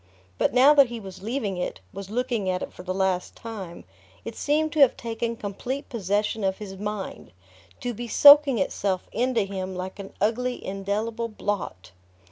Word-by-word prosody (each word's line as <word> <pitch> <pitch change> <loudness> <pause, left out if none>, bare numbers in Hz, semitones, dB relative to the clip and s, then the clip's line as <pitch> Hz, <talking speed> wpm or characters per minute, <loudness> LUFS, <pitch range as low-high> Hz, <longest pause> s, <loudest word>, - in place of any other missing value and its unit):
But - - +2
now 260 +4 +7
that 280 -3 +6
he 240 -1 -6
was 190 -3 -10
leaving 215 -3 -2
it, 180 - -3
was 195 -1 -7
looking 230 -3 -1
at 180 0 -1
it - - -7
for - - -10
the 185 0 -4
last 185 -1 -1
time, 195 -7 -8 0.4
it - - -6
seemed 310 +2 +1
to 310 - -2
have 275 -4 +6
taken 230 0 -3
complete 235 +6 -5
possession 210 -1 -1
of 190 0 0
his 200 -2 -8
mind, 205 0 -5 0.5
to 245 - -2
be 240 +2 -6
soaking 285 +1 +8
itself 190 -1 -1
into 240 0 +1
him 190 -1 -5
like 185 +2 -6
an 195 -1 -8
ugly 245 +5 -1
indelible 210 +4 -2
blot. 205 - -4
210 Hz, 175 wpm, -25 LUFS, 190-240 Hz, 0.5 s, soaking